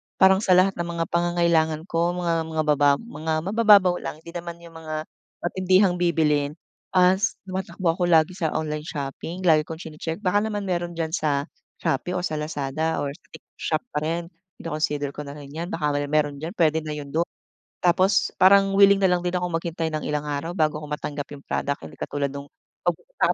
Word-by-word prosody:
Parang 190 Hz, 0 st, +6 dB
sa 195 Hz, -4 st, +4 dB
lahat 185 Hz, +2 st, +5 dB
ng 170 Hz, -, -1 dB
mga 170 Hz, -1 st, -2 dB
pangangailangan 170 Hz, -2 st, +2 dB
ko, 170 Hz, 0 st, 0 dB
mga 165 Hz, -2 st, 0 dB
mga 160 Hz, -1 st, -1 dB
baba 145 Hz, -2 st, +4 dB
mga 160 Hz, -5 st, -3 dB
mabababaw 200 Hz, -2 st, +5 dB
lang, 155 Hz, -, -7 dB
hindi 170 Hz, -, -10 dB
naman 170 Hz, 0 st, -6 dB
'yung 170 Hz, -, -12 dB
mga 155 Hz, -1 st, -4 dB, 0.4 s
matindihang 185 Hz, +1 st, +3 dB
bibilhin, 150 Hz, -4 st, +1 dB, 0.4 s
as 185 Hz, +3 st, +4 dB
tumatakbo 185 Hz, -2 st, -2 dB
ako 175 Hz, +2 st, -2 dB
lagi 160 Hz, -1 st, +4 dB
sa 160 Hz, -3 st, -1 dB
online 150 Hz, 0 st, -3 dB
shopping. 155 Hz, +5 st, -5 dB
Lagi 155 Hz, -3 st, +4 dB
kong 160 Hz, +2 st, -7 dB
chine-check 160 Hz, +4 st, -6 dB
baka 190 Hz, +2 st, +3 dB
naman 210 Hz, -1 st, -2 dB
meron 175 Hz, -2 st, -2 dB
diyan 160 Hz, -1 st, -2 dB
sa 145 Hz, -3 st, 0 dB, 0.4 s
Shopee 140 Hz, +7 st, 0 dB
o 180 Hz, -, -1 dB
sa 155 Hz, -3 st, -2 dB
Lazada 150 Hz, +1 st, -2 dB
or 140 Hz, -, -2 dB
TikTok 160 Hz, +2 st, -16 dB
shop 155 Hz, -, -1 dB
pa -, -, -1 dB
rin. 170 Hz, +1 st, -2 dB, 0.3 s
Kino-consider 150 Hz, -3 st, -2 dB
ko 145 Hz, 0 st, -8 dB
na 140 Hz, -, -7 dB
rin 145 Hz, -2 st, -10 dB
'yan 165 Hz, +3 st, -4 dB
baka 155 Hz, -4 st, -1 dB
naman 145 Hz, 0 st, -1 dB
meron 145 Hz, -1 st, +1 dB
diyan 160 Hz, +3 st, -6 dB
pwede 160 Hz, -2 st, +3 dB
na 150 Hz, -, -3 dB
'yun 145 Hz, -1 st, -7 dB
do'n. 165 Hz, +3 st, +1 dB, 0.6 s
Tapos 185 Hz, +3 st, +3 dB
parang 195 Hz, +1 st, +6 dB
willing 200 Hz, 0 st, +7 dB
na 190 Hz, -2 st, +3 dB
lang 180 Hz, -, +2 dB
din 180 Hz, 0 st, -2 dB
akong 180 Hz, -1 st, -2 dB
maghintay 165 Hz, -1 st, -3 dB
ng 155 Hz, -1 st, -3 dB
ilang 150 Hz, 0 st, -1 dB
araw 150 Hz, +5 st, -3 dB
bago 155 Hz, -1 st, +1 dB
ko 150 Hz, -, -8 dB
matanggap 145 Hz, -1 st, -4 dB
'yung 140 Hz, -, -16 dB
product, 140 Hz, -, -2 dB
hindi 80 Hz, 0 st, -11 dB
katulad 140 Hz, -1 st, -2 dB
nung 140 Hz, 0 st, -7 dB, 0.4 s
'pag -, -, +3 dB
pupunta -, -, -4 dB
165 Hz, 200 wpm, -24 LUFS, 150-180 Hz, 0.6 s, willing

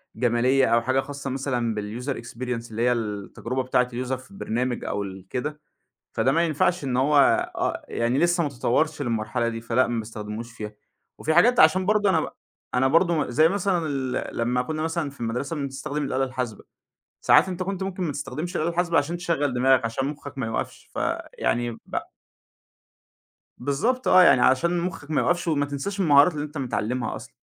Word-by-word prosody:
جمالية، 125 Hz, +2 st, +3 dB
أو 115 Hz, 0 st, +3 dB
حاجة 130 Hz, +3 st, +1 dB
خاصة 140 Hz, 0 st, -5 dB
مثلًا 125 Hz, -4 st, -1 dB
بالuser 115 Hz, +6 st, -4 dB
experience 120 Hz, 0 st, -5 dB
اللي 110 Hz, +1 st, -3 dB
هي 125 Hz, -, +3 dB
التجربة 115 Hz, +3 st, -3 dB
بتاعة 125 Hz, -1 st, +2 dB
الuser 125 Hz, +1 st, -3 dB
في 130 Hz, +7 st, -14 dB
البرنامج 125 Hz, -, -2 dB
أو 100 Hz, -, -2 dB
ال 95 Hz, -1 st, -9 dB
كده. 150 Hz, +4 st, -3 dB, 0.5 s
فده 135 Hz, -, +2 dB
ما 165 Hz, +3 st, +3 dB
ينفعش 165 Hz, +2 st, +1 dB
إن 130 Hz, -2 st, -1 dB
هو 145 Hz, +3 st, +3 dB, 0.4 s
آه -, -, -2 dB
يعني، 120 Hz, +3 st, 0 dB
لسه 175 Hz, 0 st, +3 dB
ما 145 Hz, -, -1 dB
تطوَرش 145 Hz, +4 st, 0 dB
للمرحلة 115 Hz, -1 st, -1 dB
دي، 115 Hz, 0 st, -5 dB
فلأ 120 Hz, +2 st, +2 dB
ما 120 Hz, -1 st, -1 dB
باستخدموش 110 Hz, +1 st, -6 dB
فيها، 105 Hz, -2 st, -7 dB, 0.4 s
وفي 160 Hz, -, 0 dB
حاجات 245 Hz, +8 st, +5 dB
عشان 185 Hz, +4 st, +5 dB
برضه 210 Hz, 0 st, +3 dB
أنا 165 Hz, -4 st, +3 dB
ب -, -, -4 dB, 0.4 s
أنا 130 Hz, +1 st, +3 dB
برضه 165 Hz, -1 st, +2 dB
زي 155 Hz, +6 st, +4 dB
مثلًا 190 Hz, -3 st, 0 dB
ال 135 Hz, -3 st, -3 dB
لمّا 125 Hz, +2 st, +1 dB
كنا 155 Hz, +4 st, -4 dB
مثلًا 165 Hz, -2 st, -1 dB
في 140 Hz, -, -17 dB
المدرسة 125 Hz, +7 st, -2 dB
بنستخدم 140 Hz, +1 st, -3 dB
الآلة 135 Hz, -1 st, 0 dB
الحاسبة، 125 Hz, -5 st, -4 dB, 0.6 s
ساعات -, -, +5 dB
أنت 185 Hz, 0 st, -3 dB
كنت 190 Hz, 0 st, -3 dB
ممكن 190 Hz, -1 st, -3 dB
ما 160 Hz, -, -1 dB
تستخدمش 175 Hz, +5 st, -5 dB
الآلة 160 Hz, +2 st, +1 dB
الحاسبة 170 Hz, 0 st, +1 dB
عشان 160 Hz, +5 st, 0 dB
تشغَّل 165 Hz, -6 st, 0 dB
دماغك، 130 Hz, 0 st, +3 dB
عشان 115 Hz, +4 st, -2 dB
مخَّك 145 Hz, -1 st, -7 dB
ما 125 Hz, -, -2 dB
يُقفش، 115 Hz, -, -4 dB
فيعني 120 Hz, 0 st, -1 dB
ب 115 Hz, -, -11 dB, 1.6 s
بالضبط 220 Hz, -, -1 dB
آه، 185 Hz, 0 st, +7 dB
يعني 130 Hz, -7 st, +6 dB
عشان 170 Hz, +8 st, +3 dB
مخِّك 165 Hz, -4 st, -5 dB
ما -, -, +2 dB
يُقفش 175 Hz, 0 st, 0 dB
وما 145 Hz, -3 st, +1 dB
تنساش 145 Hz, +8 st, -4 dB
المهارات 150 Hz, -1 st, +6 dB
اللي 150 Hz, -1 st, -3 dB
أنت 150 Hz, +1 st, -8 dB
متعلّمها 125 Hz, -2 st, -2 dB
أصلًا. -, -, -9 dB
135 Hz, 180 wpm, -25 LUFS, 120-160 Hz, 1.6 s, آه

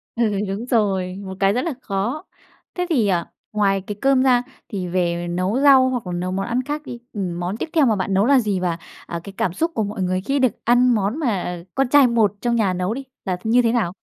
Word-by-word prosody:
Ừ, 225 Hz, -4 st, +1 dB
đúng 200 Hz, +5 st, -4 dB
rồi, 195 Hz, -6 st, 0 dB
một 190 Hz, 0 st, -6 dB
cái 195 Hz, 0 st, +3 dB
rất 250 Hz, -, 0 dB
là 330 Hz, -, -1 dB
khó. 225 Hz, -, -2 dB, 0.5 s
Thế 360 Hz, 0 st, -1 dB
thì 230 Hz, -, +2 dB, 0.4 s
ngoài 195 Hz, -2 st, +2 dB
cái 205 Hz, +2 st, -6 dB
cơm 270 Hz, -1 st, +4 dB
ra 250 Hz, -2 st, +4 dB, 0.3 s
thì 190 Hz, -4 st, -4 dB
về 175 Hz, -1 st, -1 dB
nấu 185 Hz, +8 st, -1 dB
rau 270 Hz, -2 st, +6 dB
hoặc 250 Hz, -3 st, -2 dB
nấu 180 Hz, +1 st, -2 dB
món 195 Hz, +1 st, -2 dB
ăn 240 Hz, +2 st, -1 dB
khác 295 Hz, +3 st, -3 dB
đi, 240 Hz, -, -7 dB
ừm, 180 Hz, -4 st, -3 dB
món 180 Hz, +4 st, -3 dB
tiếp 320 Hz, -, -4 dB
theo 310 Hz, -4 st, +4 dB
mà 225 Hz, -, +3 dB
bạn 195 Hz, 0 st, -2 dB
nấu 195 Hz, +2 st, +3 dB
là 275 Hz, +1 st, +5 dB
gì? 205 Hz, -5 st, -1 dB
Và, 175 Hz, -2 st, -1 dB, 0.3 s
à, 170 Hz, -, -4 dB
cái 200 Hz, -, -9 dB
cảm 175 Hz, -, 0 dB
xúc 330 Hz, -, -1 dB
của 220 Hz, -, +1 dB
mọi 205 Hz, 0 st, -4 dB
người 185 Hz, +1 st, 0 dB
khi 275 Hz, +8 st, -1 dB
được 255 Hz, -3 st, +3 dB
ăn 245 Hz, +1 st, +4 dB
món 210 Hz, +6 st, -1 dB
mà 180 Hz, -, -2 dB
con 270 Hz, -2 st, +1 dB
trai 285 Hz, -1 st, +6 dB
một 225 Hz, -4 st, +2 dB
trong 240 Hz, -1 st, +1 dB
nhà 200 Hz, -5 st, +2 dB
nấu 180 Hz, +4 st, -1 dB
đi 270 Hz, +2 st, -5 dB, 0.2 s
là 185 Hz, -2 st, -1 dB
như 235 Hz, +3 st, +4 dB
thế 230 Hz, -, +2 dB
nào? 210 Hz, -7 st, 0 dB
210 Hz, 245 wpm, -21 LUFS, 190-250 Hz, 0.5 s, rau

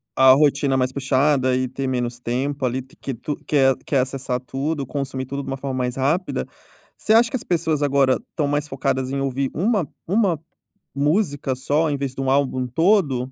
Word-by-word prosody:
a 130 Hz, 0 st, +7 dB
rotina 140 Hz, -1 st, +3 dB
mais 130 Hz, -1 st, +1 dB
puxada 135 Hz, -1 st, +2 dB
e 130 Hz, 0 st, 0 dB
ter 135 Hz, +1 st, -4 dB
menos 120 Hz, -1 st, -2 dB
tempo 130 Hz, +3 st, -2 dB
ali, 130 Hz, +2 st, -1 dB
que 130 Hz, +1 st, -8 dB
tu 140 Hz, +5 st, -4 dB
quer 135 Hz, -3 st, +3 dB
quer 140 Hz, -, +1 dB
acessar 130 Hz, -1 st, -2 dB
tudo, 140 Hz, +4 st, -3 dB
consumir 130 Hz, -1 st, -4 dB
tudo 140 Hz, +1 st, -4 dB
de -, -, -10 dB
uma 135 Hz, -, -3 dB
forma 135 Hz, -1 st, -4 dB
mais 125 Hz, -1 st, -1 dB
rápida. 150 Hz, +8 st, -1 dB, 0.5 s
Você 215 Hz, -, +1 dB
acha 235 Hz, +1 st, +5 dB
que -, -, -4 dB
as -, -, -8 dB
pessoas 160 Hz, -4 st, 0 dB
agora 135 Hz, -2 st, +3 dB
estão 150 Hz, -5 st, -1 dB
mais 145 Hz, +1 st, -1 dB
focadas 130 Hz, -1 st, -1 dB
em 140 Hz, -, -1 dB
ouvir 135 Hz, 0 st, -1 dB
uma 195 Hz, -, +1 dB, 0.2 s
uma 195 Hz, -4 st, +2 dB, 0.6 s
música 145 Hz, -2 st, +1 dB
só 145 Hz, +5 st, +1 dB
em 140 Hz, -, -1 dB
vez 135 Hz, -2 st, -4 dB
de 135 Hz, -, -4 dB
um 135 Hz, -, 0 dB
álbum 130 Hz, -2 st, +1 dB
todo? 140 Hz, -, +2 dB
135 Hz, 195 wpm, -22 LUFS, 130-150 Hz, 0.6 s, a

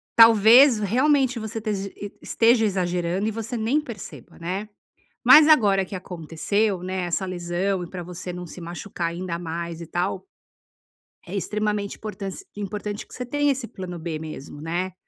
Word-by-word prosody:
talvez 230 Hz, +3 st, +8 dB
realmente 255 Hz, +4 st, +2 dB
você 220 Hz, +1 st, -4 dB
tej 200 Hz, -3 st, -2 dB
e 205 Hz, -1 st, -7 dB
esteja 230 Hz, 0 st, +3 dB
exagerando 180 Hz, 0 st, 0 dB
e -, -, 0 dB
você 225 Hz, +2 st, -4 dB
nem 240 Hz, +8 st, +1 dB
perceba, 235 Hz, -9 st, -10 dB
né. 190 Hz, +5 st, -4 dB, 0.6 s
Mas 305 Hz, 0 st, +9 dB
agora 205 Hz, -10 st, +5 dB
que 190 Hz, -, -9 dB
aconteceu, 180 Hz, +3 st, -1 dB
né, 185 Hz, 0 st, -2 dB
essa 175 Hz, +3 st, -1 dB
lesão 180 Hz, +1 st, -2 dB
e -, -, -10 dB
para 180 Hz, -2 st, -6 dB
você 180 Hz, +1 st, -7 dB
não 180 Hz, 0 st, -7 dB
se 180 Hz, -, -10 dB
machucar 170 Hz, 0 st, -4 dB
ainda 170 Hz, 0 st, -4 dB
mais 170 Hz, 0 st, -5 dB
e 170 Hz, -, -7 dB
tal, 180 Hz, +3 st, -2 dB, 1.0 s
é 185 Hz, -, -6 dB
extremamente 210 Hz, 0 st, -2 dB
importance 200 Hz, -3 st, -6 dB
importante 205 Hz, 0 st, -5 dB
que -, -, -16 dB
você 250 Hz, -, -5 dB
tenha 290 Hz, +3 st, +1 dB
esse 260 Hz, -3 st, -3 dB
plano 180 Hz, -4 st, -7 dB
b 160 Hz, -1 st, -4 dB
mesmo, 155 Hz, -2 st, -8 dB
né. 175 Hz, +3 st, -2 dB
195 Hz, 165 wpm, -24 LUFS, 175-220 Hz, 1.0 s, Mas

